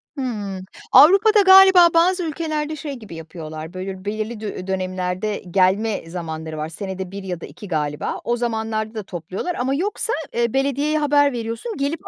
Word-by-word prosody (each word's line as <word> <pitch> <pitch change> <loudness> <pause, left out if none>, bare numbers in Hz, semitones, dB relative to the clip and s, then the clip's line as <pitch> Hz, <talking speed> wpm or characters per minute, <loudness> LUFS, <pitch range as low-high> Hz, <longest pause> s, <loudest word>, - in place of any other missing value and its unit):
Hımm, 205 -8 -4 0.3
Avrupa'da 395 - +7
galiba 380 -2 +8
bazı 360 +2 +3
ülkelerde 310 -1 -3
şey 290 -1 -6
gibi 215 -9 -10
yapıyorlar, 160 0 -8
böyle 190 +1 -6
belirli 215 +2 -3
dö 200 -3 -6
dönemlerde, 185 +2 -2
gelme 195 0 +1
zamanları 160 -2 -6
var, 155 +1 -4
senede 190 +1 -6
1 200 0 -7
ya 180 -3 -5
da - - -6
2 205 - -11
galiba 150 -3 -2
o 240 0 0
zamanlarda 220 -2 -2
da 215 - -4
topluyorlar 185 - -5
ama 260 +2 -1
yoksa, 410 +7 -2 0.2
eee, 235 0 0
belediyeye 280 +3 +1
haber 285 -1 +3
veriyorsun 230 - -5
gelip 285 +3 -3
220 Hz, 160 wpm, -21 LUFS, 185-290 Hz, 0.3 s, galiba